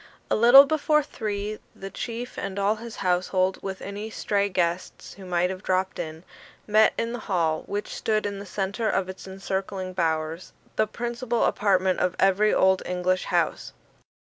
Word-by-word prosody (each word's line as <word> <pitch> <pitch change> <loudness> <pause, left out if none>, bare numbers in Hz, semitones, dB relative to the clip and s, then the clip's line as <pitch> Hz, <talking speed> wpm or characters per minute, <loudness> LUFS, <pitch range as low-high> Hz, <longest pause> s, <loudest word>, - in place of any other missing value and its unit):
A - - +4
little 240 +5 +9
before 300 0 +2
three, 210 -5 -4 0.2
the 195 0 -8
chief 240 +1 -5
and 195 0 -5
all 200 +2 +1
his 230 0 -8
household, 185 +1 +1
with 190 -1 -6
any 205 +2 -5
stray 200 -2 0
guests 175 -1 -2
who 195 -2 -11
might 180 +1 +1
have 185 0 -7
dropped 185 -1 -1
in, 160 +1 -6 0.4
met 215 +1 +4
in 230 +1 -2
the 245 - -4
hall, 165 -4 +1
which 205 +1 -4
stood 215 -1 0
in 200 -1 -3
the 200 - -8
centre 200 +4 -2
of 190 -1 0
its 190 +1 -8
encircling 190 0 -4
bowers 160 -1 -2 0.2
the 215 - +2
principal 240 +1 -2
apartment 190 -2 +2
of 180 0 0
every 195 +2 +3
Old 190 0 +3
English 180 +1 -1
house. - - -1
195 Hz, 165 wpm, -25 LUFS, 185-215 Hz, 0.4 s, little